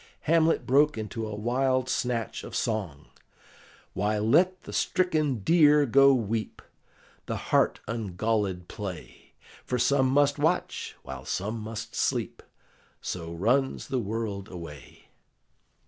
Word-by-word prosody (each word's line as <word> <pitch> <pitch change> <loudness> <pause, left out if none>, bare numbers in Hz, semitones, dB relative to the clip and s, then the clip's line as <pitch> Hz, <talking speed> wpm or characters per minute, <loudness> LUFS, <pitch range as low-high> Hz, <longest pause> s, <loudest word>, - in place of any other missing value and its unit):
Hamlet 165 +1 +2
broke 145 +1 +3
into 110 +1 -4
a 105 - -5
wild 130 +4 0
snatch 120 -4 -2
of - - -8
song: 95 -11 -3 0.8
"Why, 105 +2 0
let 175 - +2
the - - -9
stricken 155 - 0
deer 150 - +5
go 140 +2 +6
weep, 115 -3 -2 0.6
The - - -2
hart - - +1
ungallèd 105 -3 -2
play; 100 -5 -8 0.3
For 125 - -2
some 130 +2 +3
must 145 +2 +2
watch, - - -1
while 65 -1 -8
some 105 - -3
must 115 +1 -6
sleep, - - -1 0.6
So 85 -2 -5
runs 120 +11 0
the 130 - 0
world 105 -2 -4
away." 75 -7 -11
115 Hz, 120 wpm, -27 LUFS, 105-135 Hz, 0.8 s, go